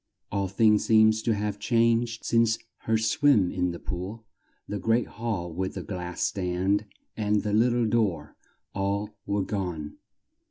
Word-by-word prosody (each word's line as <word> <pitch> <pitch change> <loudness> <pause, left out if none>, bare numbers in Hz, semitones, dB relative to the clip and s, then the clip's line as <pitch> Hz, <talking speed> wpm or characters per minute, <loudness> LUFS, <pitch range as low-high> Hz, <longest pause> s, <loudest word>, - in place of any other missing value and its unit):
All 100 -1 0
things 105 +2 +3
seemed 110 -1 +6
to 115 - +2
have 105 0 -3
changed 115 0 +1
since 115 -1 +3 0.3
her 110 0 +3
swim 110 - +3
in 90 0 0
the 85 - -5
pool; 95 +7 -6 0.4
the 105 - -3
great 115 +3 +2
hall 100 -7 -4
with 95 +3 -3
the 95 - -4
glass 90 0 -4
stand 95 +2 0 0.3
and 105 -1 0
the 105 -1 -2
lit 115 +3 +4
tle 120 -1 +1
door 100 -10 0 0.4
all 100 +2 -1 0.2
were 100 -1 0
gone. 90 -7 -4
105 Hz, 155 wpm, -27 LUFS, 95-115 Hz, 0.4 s, seemed